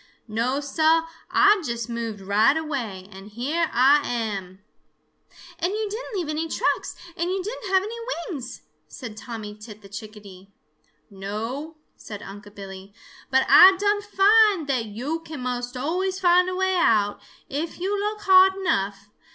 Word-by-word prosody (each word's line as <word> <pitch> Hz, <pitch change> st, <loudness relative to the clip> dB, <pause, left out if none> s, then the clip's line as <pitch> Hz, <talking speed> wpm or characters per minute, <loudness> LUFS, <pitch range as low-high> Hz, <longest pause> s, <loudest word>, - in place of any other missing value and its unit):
No, 235 Hz, +5 st, -1 dB
Sah, 315 Hz, +3 st, +2 dB, 0.2 s
Ah 410 Hz, 0 st, +5 dB
just 235 Hz, -4 st, -3 dB
moved 230 Hz, -3 st, -5 dB
right 215 Hz, +9 st, +3 dB
away, 240 Hz, -12 st, -4 dB
and 195 Hz, +1 st, -11 dB
here 290 Hz, +10 st, -1 dB
Ah 275 Hz, +4 st, +5 dB
am." 205 Hz, -5 st, -4 dB, 1.0 s
"And 355 Hz, +3 st, 0 dB
you 430 Hz, 0 st, -2 dB
didn't 445 Hz, +1 st, -6 dB
leave 355 Hz, -5 st, -2 dB
any 310 Hz, +2 st, -2 dB
tracks, -, -, -1 dB, 0.2 s
and 340 Hz, +1 st, -2 dB
you 375 Hz, 0 st, -2 dB
didn't 425 Hz, -1 st, -6 dB
have 380 Hz, 0 st, +4 dB
any 435 Hz, +3 st, -6 dB, 0.4 s
wings," 260 Hz, -6 st, -7 dB, 0.2 s
said 235 Hz, -5 st, -9 dB
Tommy 220 Hz, -2 st, -7 dB
Tit 210 Hz, 0 st, -13 dB
the -, -, -12 dB
Chickadee. 200 Hz, -2 st, -11 dB, 0.6 s
"No," 225 Hz, +11 st, -5 dB, 0.2 s
said 205 Hz, -2 st, -9 dB
Unc' 205 Hz, +1 st, -10 dB
Billy, 195 Hz, 0 st, -10 dB, 0.4 s
"but 265 Hz, -1 st, +3 dB
Ah 365 Hz, +7 st, +9 dB
done 410 Hz, +1 st, +1 dB
find 410 Hz, -3 st, +4 dB
that 255 Hz, -5 st, -1 dB
yo' 255 Hz, +10 st, -4 dB
can 315 Hz, -3 st, -9 dB
most 245 Hz, 0 st, -4 dB
always 370 Hz, +7 st, -1 dB
find 360 Hz, 0 st, +4 dB
a 370 Hz, -, -3 dB
way 375 Hz, 0 st, +1 dB
out, 210 Hz, -10 st, +2 dB, 0.3 s
if 310 Hz, +5 st, -4 dB
yo' 375 Hz, +3 st, -2 dB
look 415 Hz, +1 st, -2 dB
hard 380 Hz, -1 st, +6 dB
enough. 200 Hz, -, -2 dB
270 Hz, 155 wpm, -24 LUFS, -, 1.0 s, Ah